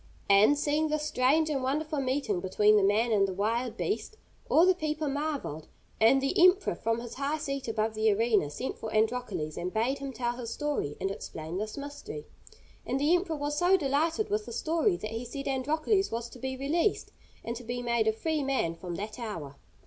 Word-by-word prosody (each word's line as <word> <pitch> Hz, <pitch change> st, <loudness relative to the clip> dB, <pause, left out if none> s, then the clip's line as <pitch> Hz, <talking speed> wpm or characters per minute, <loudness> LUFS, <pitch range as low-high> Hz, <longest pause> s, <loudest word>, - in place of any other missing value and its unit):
And, 210 Hz, +9 st, +6 dB
seeing 300 Hz, +2 st, +1 dB
this 305 Hz, 0 st, -1 dB
strange 300 Hz, +3 st, +2 dB
and 275 Hz, -3 st, 0 dB
wonderful 300 Hz, +3 st, -1 dB
meeting 255 Hz, -7 st, 0 dB
between 210 Hz, +3 st, +3 dB
the 210 Hz, -, +5 dB
man 215 Hz, +4 st, +3 dB
and 200 Hz, -2 st, +4 dB
the 190 Hz, -, -4 dB
wild 230 Hz, +4 st, -1 dB
beast, 430 Hz, +1 st, -3 dB, 0.3 s
all 330 Hz, -, +6 dB
the 375 Hz, -, +5 dB
people 310 Hz, -2 st, -2 dB
marvelled, 285 Hz, -, -3 dB, 0.3 s
and 230 Hz, +5 st, +6 dB
the 275 Hz, +5 st, +2 dB
emperor, 370 Hz, +2 st, +5 dB
from 225 Hz, +1 st, -1 dB
his 235 Hz, 0 st, -7 dB
high 280 Hz, +3 st, -1 dB
seat 275 Hz, -4 st, -4 dB
above 220 Hz, 0 st, 0 dB
the 215 Hz, 0 st, +2 dB
arena, 210 Hz, -6 st, +2 dB
sent 240 Hz, -, -5 dB
for 220 Hz, -, -5 dB
Androcles, 220 Hz, -8 st, -1 dB
and 180 Hz, +1 st, -3 dB
bade 240 Hz, +7 st, 0 dB
him 275 Hz, 0 st, -5 dB
tell 240 Hz, 0 st, -2 dB
his 240 Hz, -2 st, -5 dB
story 290 Hz, -, -2 dB
and 195 Hz, -, -1 dB
explain 165 Hz, -2 st, -6 dB
this 215 Hz, +4 st, -4 dB
mystery. 290 Hz, +11 st, -7 dB, 0.6 s
And 260 Hz, +2 st, -1 dB
the 300 Hz, +5 st, +4 dB
emperor 350 Hz, -2 st, -1 dB
was 290 Hz, 0 st, -2 dB
so 360 Hz, +2 st, +5 dB
delighted 325 Hz, +7 st, 0 dB
with 425 Hz, 0 st, -1 dB
the -, -, -6 dB
story 335 Hz, +4 st, +1 dB
that 215 Hz, -, -6 dB
he 225 Hz, +2 st, -4 dB
said 275 Hz, +3 st, -6 dB
Androcles 310 Hz, -, +1 dB
was 230 Hz, +1 st, -3 dB
to 250 Hz, -, -12 dB
be 260 Hz, +1 st, -4 dB
released 325 Hz, +9 st, 0 dB, 0.3 s
and 235 Hz, -, -4 dB
to 245 Hz, -, -8 dB
be 245 Hz, +1 st, -4 dB
made 235 Hz, -2 st, +1 dB
a -, -, +5 dB
free 310 Hz, +7 st, -1 dB
man 265 Hz, -12 st, 0 dB
from 175 Hz, +1 st, -6 dB
that 210 Hz, +4 st, -6 dB
hour. 165 Hz, -, -6 dB
260 Hz, 205 wpm, -29 LUFS, 220-300 Hz, 0.6 s, And